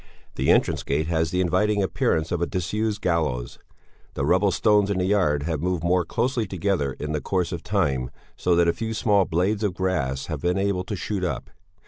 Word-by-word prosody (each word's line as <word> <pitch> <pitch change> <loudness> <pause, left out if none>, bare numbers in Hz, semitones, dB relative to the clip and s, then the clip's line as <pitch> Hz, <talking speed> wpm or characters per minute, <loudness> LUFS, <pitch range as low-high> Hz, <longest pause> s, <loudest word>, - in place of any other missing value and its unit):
The - - -1
entrance - - +3
gate 75 +3 -1
has 80 -2 +1
the 90 +3 0
inviting 105 +3 +2
appearance 80 -2 0
of 85 -1 -1
a 85 - +1
disused 105 +4 -2
gallows. 75 -9 -1 0.6
The 70 - -1
rubble 90 +6 +3
stones 105 +1 +3
in 100 - 0
the 90 - +1
yard 90 -8 +2
have 80 -2 -2
moved 90 -1 -1
more 90 0 +2
closely 120 +3 -1
together 90 -7 -1
in 75 +3 -5
the 75 -1 -1
course 90 -3 -1
of 85 -3 -4
time, 70 -11 0 0.3
so 90 -1 +1
that 85 0 +4
a 85 - +3
few 115 0 -4
small 100 -3 +3
blades 95 +6 0
of 100 -4 0
grass 70 -9 -1
have 80 -4 -5
been 90 +2 +1
able 95 -2 0
to 105 - -4
shoot 100 0 -3
up. 80 -2 -3
90 Hz, 205 wpm, -24 LUFS, 80-100 Hz, 0.6 s, that